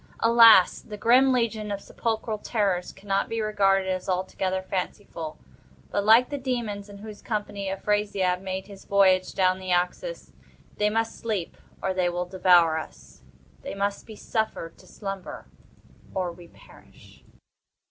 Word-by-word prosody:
Alas! 230 -4 +7
the 210 - -9
grim 255 +5 +5
legion 225 -4 -1
of 200 - -3
sepulchral 220 0 -3
terrors 195 -6 -1
cannot 195 0 -2
be 225 - -2
regarded 195 -3 +2
as 185 0 -3
altogether 185 0 -1
fanciful—but, 160 - -6
like 225 +4 +6
the 285 - -3
Demons 230 -6 -3
in 200 - -11
whose 210 0 -10
company 205 -3 -4
Afrasiab 195 -2 0
made 190 0 -4
his 200 -1 -13
voyage 190 -2 +3
down 185 0 +2
the 185 -1 -5
Oxus, 180 - -2 0.4
they 210 0 +2
must 225 +1 -2
sleep, 210 -7 -3 0.3
or 190 - 0
they 180 -1 +1
will 175 +1 -2
devour 175 -3 +4
us—they 65 - -12
must 200 0 -2
be 220 - -9
suffered 215 -7 -3
to - - -18
slumber, 195 -3 -7 0.7
or 185 -2 -1
we 170 0 -14
perish. 65 - -19
195 Hz, 140 wpm, -26 LUFS, 180-215 Hz, 0.7 s, Alas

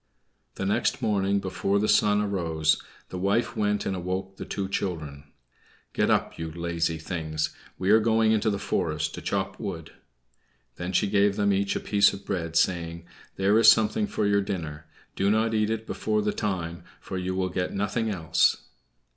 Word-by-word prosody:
The 95 - -3
next 125 +6 0
morning, 100 -1 +1
before 95 +1 -1
the 105 +1 +1
sun 105 -1 +4
arose, 80 -6 0 0.3
the 90 - -5
wife 100 +5 +1
went 105 -1 0
and 95 - -1
awoke 95 +2 -4
the - - -6
two 100 -1 -3
children. 80 -7 -4 0.7
"Get - - +1
up, - - +1
you 80 -1 -4
lazy 85 0 -1
things; 80 -2 -3 0.2
we 95 +2 +1
are 110 - +7
going 110 0 +3
into 110 0 +2
the 100 - -1
forest 80 -4 -1
to 90 - -7
chop 95 +2 -2
wood." 85 -5 -6 0.8
Then 90 +1 -4
she 105 - +2
gave 100 0 +3
them 100 -1 +2
each 100 0 0
a - - 0
piece 100 -1 +3
of 100 0 -9
bread, 85 -4 -3
saying, 85 -1 0 0.3
"There 100 +3 +3
is 115 - +5
something 115 - +2
for 105 - -1
your 100 0 +3
dinner; 80 -6 -5 0.3
do 100 - +1
not 110 +2 +2
eat 110 -1 +1
it 110 0 -2
before 105 -1 -1
the 105 - 0
time, 85 -4 -3 0.2
for 95 - -5
you 90 0 -2
will 95 -1 0
get 90 0 -2
nothing 105 +3 -1
else." 85 -6 +2
95 Hz, 180 wpm, -26 LUFS, 85-105 Hz, 0.8 s, are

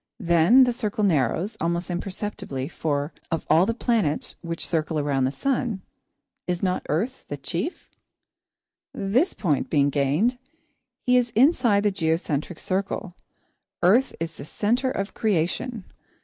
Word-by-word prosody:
Then 175 +7 +5
the 245 -1 +2
circle 215 -3 -2
narrows, 170 - +1
almost 170 +2 -1
imperceptibly, 185 -6 -4
for, 145 -2 -2 0.2
of 165 -2 -2
all 165 +5 +5
the 230 - 0
planets 220 - 0
which 170 0 -3
circle 160 -1 -1
around 140 -3 +1
the 130 - 0
sun, 240 - -1 0.6
is 180 0 -2
not 185 -1 0
Earth 220 - -1
the 145 - -5
chief? 175 - -4 1.0
This 245 - +1
point 155 -9 0
being 145 -2 +3
gained, 155 - +1 0.7
he 250 0 +5
is 245 -1 +2
inside 240 -5 +4
the 205 - +3
geocentric 160 -2 -1
circle. 190 -1 -3 0.7
Earth 230 +10 +4
is 165 0 -4
the - - -7
centre 240 - 0
of 200 -5 -3
creation. 215 +3 -1
185 Hz, 135 wpm, -25 LUFS, 160-230 Hz, 1.0 s, Then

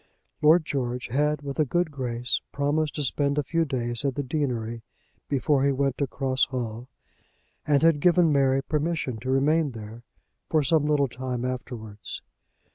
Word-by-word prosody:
Lord 155 +2 +5
George 125 -4 -3
had, 150 +3 +1
with 140 0 -5
a - - +6
good 175 +3 0
grace, 125 -3 -2
promised 145 +2 0
to 150 - -1
spend 140 +1 +1
a 150 - +2
few 165 +4 0
days 120 -4 -2
at 135 -3 0
the 145 - -2
deanery 125 -5 -2 0.5
before 140 0 +2
he 140 - +3
went 135 -1 0
to 140 - +1
Cross 130 0 0
Hall, 120 -2 -5 0.8
and 145 0 +3
had 165 -3 +5
given 175 -1 +4
Mary 135 -1 +3
permission 150 -5 -1
to 130 +4 -5
remain 145 +2 +2
there 110 +1 -9 0.5
for 155 -2 +3
some 150 +1 +2
little 145 -2 +3
time 125 0 -4
afterwards. 120 -5 -6
140 Hz, 165 wpm, -26 LUFS, 125-150 Hz, 0.8 s, a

